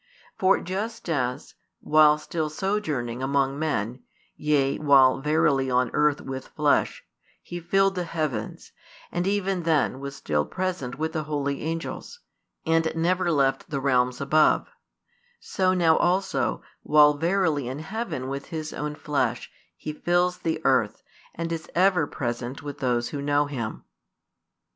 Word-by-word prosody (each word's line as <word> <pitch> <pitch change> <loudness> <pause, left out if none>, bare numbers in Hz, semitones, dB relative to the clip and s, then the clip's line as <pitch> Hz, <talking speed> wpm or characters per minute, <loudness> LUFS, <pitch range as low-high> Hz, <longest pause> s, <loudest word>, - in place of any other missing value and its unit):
For 190 +1 +3
just 200 +5 -5
as, 125 -4 -2 0.3
while 150 0 +5
still 155 0 -3
sojourning 150 - -2
among 135 +1 0
men, 125 -5 -2 0.3
yea, 140 -2 +1
while 135 -3 +5
verily 150 -3 +2
on 125 -1 +1
earth 150 -1 +2
with 130 0 -6
flesh, 150 -1 0 0.3
He 175 - -7
filled 195 +3 +2
the 180 -2 -3
heavens, 155 -10 -4 0.4
and 175 +1 -1
even 195 -2 0
then 155 -5 +1
was 140 0 -6
still 75 - -1
present 180 - -4
with 160 +1 -2
the 155 -2 -2
holy 140 -2 -2
angels, 165 - -5 0.5
and 160 0 +2
never 175 +2 +1
left 135 -3 +1
the 140 - -2
realms 125 -2 +1
above; 155 +3 +3 0.7
so 185 -1 0
now 165 -3 +4
also, 175 -8 0 0.2
while 150 -1 +5
verily 160 -3 0
in 130 +2 -4
heaven 160 - -4
with 140 +1 -5
His 155 -3 -5
own 150 0 -4
flesh, 150 -1 -2 0.3
He 155 - -5
fills 175 +3 +1
the 160 -1 -2
earth, 115 -5 +2 0.3
and 165 0 -4
is 165 -1 -5
ever 180 -4 +3
present 120 +1 -4
with 145 -1 -7
those 120 -3 0
who 145 - -5
know 145 +1 +2
Him. 125 -7 -5
150 Hz, 145 wpm, -25 LUFS, 135-170 Hz, 0.7 s, while